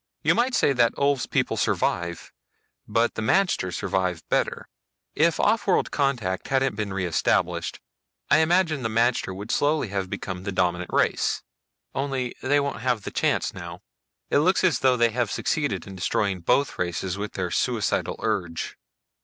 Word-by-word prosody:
You -, -, +4 dB
might 245 Hz, +1 st, +1 dB
say 140 Hz, -, +3 dB
that 120 Hz, -3 st, +3 dB
Ulv's 140 Hz, -2 st, +1 dB
people -, -, 0 dB
survive, 85 Hz, -1 st, -1 dB, 0.5 s
but 115 Hz, +2 st, +1 dB
the -, -, -4 dB
magter 140 Hz, -, +2 dB
survive 90 Hz, -2 st, -2 dB
better. -, -, 0 dB, 0.5 s
If 165 Hz, +1 st, +2 dB
offworld 210 Hz, -3 st, +2 dB
contact 120 Hz, -10 st, -1 dB
hadn't 135 Hz, -2 st, +1 dB
been 105 Hz, -1 st, -3 dB
re 95 Hz, -1 st, -2 dB
established, 85 Hz, -, 0 dB, 0.5 s
I 145 Hz, -, +5 dB
imagine 160 Hz, -2 st, +2 dB
that 115 Hz, -, -1 dB
the 110 Hz, -, -6 dB
magter 115 Hz, -5 st, +1 dB
would 100 Hz, +3 st, -6 dB
slowly 145 Hz, -5 st, +1 dB
have 95 Hz, -1 st, -3 dB
become 95 Hz, -1 st, -5 dB
the 100 Hz, +1 st, -4 dB
dominant 90 Hz, -1 st, 0 dB
race. -, -, +1 dB, 0.5 s
Only 135 Hz, -3 st, -2 dB
they 145 Hz, +2 st, +3 dB
won't 140 Hz, -4 st, -3 dB
have 120 Hz, -4 st, 0 dB
the -, -, -5 dB
chance -, -, 0 dB
now. -, -, -8 dB, 0.5 s
It -, -, +4 dB
looks 185 Hz, +6 st, +3 dB
as 170 Hz, -10 st, +3 dB
though 130 Hz, -1 st, +3 dB
they 120 Hz, -1 st, +3 dB
have 120 Hz, -1 st, 0 dB
succeeded 110 Hz, -, -1 dB
in 95 Hz, -1 st, -9 dB
destroying 95 Hz, +1 st, 0 dB
both 135 Hz, +11 st, +1 dB
races 90 Hz, +2 st, -2 dB
with 105 Hz, 0 st, -4 dB
their 90 Hz, -3 st, -3 dB
suicidal 115 Hz, -7 st, 0 dB
urge." 90 Hz, -7 st, -2 dB
115 Hz, 165 wpm, -25 LUFS, 95-140 Hz, 0.5 s, I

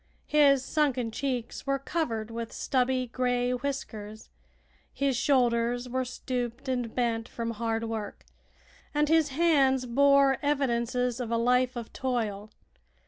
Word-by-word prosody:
His 280 Hz, -3 st, +4 dB
sunken 265 Hz, -7 st, 0 dB
cheeks 255 Hz, +1 st, -4 dB
were 275 Hz, 0 st, +2 dB
covered 235 Hz, -7 st, -3 dB
with 230 Hz, 0 st, -5 dB
stubby 255 Hz, -1 st, 0 dB
gray 245 Hz, 0 st, 0 dB
whiskers, 235 Hz, -5 st, -5 dB, 0.6 s
his 275 Hz, -2 st, 0 dB
shoulders 245 Hz, -2 st, +1 dB
were 260 Hz, +1 st, -1 dB
stooped 250 Hz, 0 st, -4 dB
and 245 Hz, -3 st, -2 dB
bent 230 Hz, -1 st, -1 dB
from 230 Hz, -1 st, -4 dB
hard 225 Hz, 0 st, -2 dB
work, 225 Hz, -2 st, -5 dB, 0.7 s
and 295 Hz, 0 st, +2 dB
his 320 Hz, -2 st, +4 dB
hands 270 Hz, -4 st, +3 dB
bore 275 Hz, +2 st, +4 dB
evidences 250 Hz, -4 st, 0 dB
of 245 Hz, -3 st, -3 dB
a 230 Hz, -, +1 dB
life 250 Hz, +2 st, +2 dB
of 235 Hz, -2 st, -7 dB
toil. 220 Hz, -5 st, -2 dB
250 Hz, 130 wpm, -28 LUFS, 235-275 Hz, 0.7 s, His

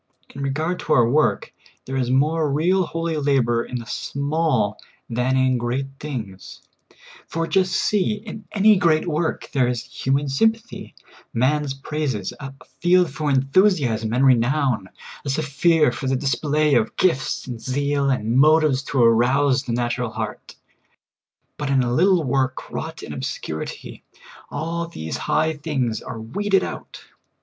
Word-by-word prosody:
In 140 Hz, -, -7 dB
regard 155 Hz, +6 st, -1 dB
to 155 Hz, -, 0 dB
our 120 Hz, -5 st, +5 dB
work, 150 Hz, +6 st, +1 dB, 0.3 s
there 135 Hz, -, -5 dB
is 125 Hz, -2 st, 0 dB
more 150 Hz, +3 st, +2 dB
real 175 Hz, +6 st, +2 dB
holy 165 Hz, -1 st, -2 dB
labor 130 Hz, -5 st, +1 dB
in 125 Hz, -, -5 dB
the 115 Hz, -, -7 dB
small 140 Hz, -6 st, -1 dB, 0.3 s
than 125 Hz, +3 st, 0 dB
in 130 Hz, -1 st, +2 dB
great 120 Hz, +3 st, -1 dB
things; 110 Hz, -11 st, -7 dB, 0.6 s
for 165 Hz, 0 st, -2 dB
just 185 Hz, +1 st, +1 dB
see, 205 Hz, +1 st, +1 dB
in 210 Hz, 0 st, -9 dB
any 210 Hz, 0 st, +5 dB
great 165 Hz, -2 st, +2 dB
work 160 Hz, 0 st, -2 dB
there 130 Hz, -4 st, +2 dB
is 120 Hz, -1 st, -2 dB
human 140 Hz, +2 st, -1 dB
sympathy, 225 Hz, +12 st, -1 dB, 0.4 s
man's 135 Hz, +3 st, +1 dB
praises, 135 Hz, -7 st, -3 dB
a 135 Hz, -2 st, -7 dB, 0.3 s
field 180 Hz, -2 st, +3 dB
for 150 Hz, +2 st, -2 dB
enthusiasm 135 Hz, -, +2 dB
and 125 Hz, +3 st, +2 dB
renown, 130 Hz, -4 st, +2 dB, 0.3 s
a 140 Hz, -, -4 dB
sphere 155 Hz, +3 st, +2 dB
for 135 Hz, -, -5 dB
the 135 Hz, -, +1 dB
dis 135 Hz, 0 st, 0 dB
play 150 Hz, +2 st, +1 dB
of 115 Hz, -3 st, +1 dB
gifts 135 Hz, -8 st, +1 dB
and 120 Hz, -3 st, -7 dB
zeal, 140 Hz, +1 st, 0 dB
and 120 Hz, -2 st, 0 dB
motives 155 Hz, -2 st, +4 dB
to 135 Hz, -3 st, +1 dB
arouse 125 Hz, +4 st, +3 dB
the 120 Hz, -, -3 dB
natu 120 Hz, +1 st, -1 dB
ral 120 Hz, -2 st, -1 dB
heart; 110 Hz, -1 st, -6 dB, 1.0 s
but 145 Hz, -2 st, -3 dB
in 135 Hz, -2 st, +3 dB
a 120 Hz, 0 st, -1 dB
little 180 Hz, +3 st, +3 dB
work 130 Hz, -1 st, -1 dB
wrought -, -, -6 dB
in -, -, -7 dB
obscurity, 80 Hz, 0 st, -6 dB, 0.5 s
all 165 Hz, +3 st, -3 dB
these 80 Hz, -, -5 dB
high 160 Hz, +1 st, +2 dB
things 140 Hz, -7 st, -2 dB
are 115 Hz, -, -7 dB
weeded 195 Hz, -, 0 dB
out. -, -, -7 dB
140 Hz, 155 wpm, -22 LUFS, 125-160 Hz, 1.0 s, our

